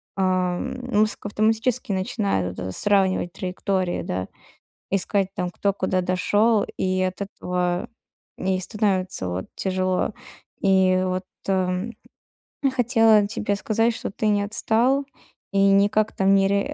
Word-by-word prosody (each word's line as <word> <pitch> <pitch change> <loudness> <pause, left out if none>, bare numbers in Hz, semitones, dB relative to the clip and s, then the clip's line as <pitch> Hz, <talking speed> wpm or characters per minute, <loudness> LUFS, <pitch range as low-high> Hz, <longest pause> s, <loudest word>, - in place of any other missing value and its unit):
ам, 185 +3 0 0.2
мозг 215 0 +1
автоматически 220 +2 0
начинает 190 - -1
вот - - -5
это 95 - -4
сравнивать 190 - +1
траектории, 185 -1 -2
да. 95 +1 -3 0.6
Искать 195 0 0
там 180 - -2
кто 200 +3 0
куда 185 -1 0
дошёл, 205 +4 +2
и 185 0 0
от 185 +1 -2
этого 180 -2 -2 0.5
не 190 0 0
и - - -4
становится 185 - -1
вот 90 +1 -4
тяжело. 185 +1 -1 0.5
И 190 -1 +3
вот 185 0 -2 1.4
и 275 - +4
хотела 225 -4 +4
тебе 210 -1 -1
сказать, 225 +3 +1
что - - -4
ты 215 +2 -3
не 205 -1 +2
отстал 230 +6 +1 0.5
и 200 - +1
никак 205 +2 +2
там 195 0 +4
ни 195 0 +4
реа 200 0 +2
195 Hz, 135 wpm, -23 LUFS, 185-210 Hz, 1.4 s, и